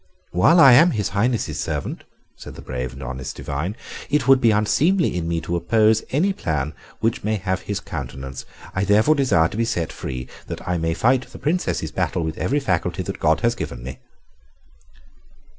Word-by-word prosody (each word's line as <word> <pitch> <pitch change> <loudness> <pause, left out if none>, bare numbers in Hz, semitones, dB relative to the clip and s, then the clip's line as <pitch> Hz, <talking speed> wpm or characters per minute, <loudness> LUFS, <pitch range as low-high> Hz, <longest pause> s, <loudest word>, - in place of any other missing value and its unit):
"While 125 - +5
I 135 -5 +9
am 165 +8 +7
His 105 - -1
Highness's 115 +5 -1
servant," - - -4 0.3
said - - -11
the - - -11
brave 65 -1 -4
and 70 +1 -9
honest 65 0 -6
divine, 75 +8 -4 0.3
"it 150 0 +1
would 135 -1 +6
be 115 - +5
unseemly 145 - +2
in 85 -2 -2
me 85 0 0
to 85 +2 -3
oppose 110 +5 +3
any 180 +9 +1
plan 75 - -2 0.3
which 115 0 0
may 110 +1 0
have 95 -2 -2
his 100 -1 -3
countenance. 65 -2 -7 0.3
I 95 - 0
therefore 105 +9 +4
desire 125 - +3
to 105 - -7
be 115 - +2
set 90 -9 -2
free, 65 -1 -6 0.2
that - - -7
I 90 -1 0
may 80 0 -1
fight 125 +6 +2
the - - -11
Princess's 170 +5 -1
battle 85 - -1
with 80 0 -4
every 145 +3 +1
faculty 90 - -1
that - - -6
God 80 +1 +2
has 120 0 +2
given 60 - -6
me." 65 +1 -7
100 Hz, 190 wpm, -22 LUFS, 80-120 Hz, 0.3 s, I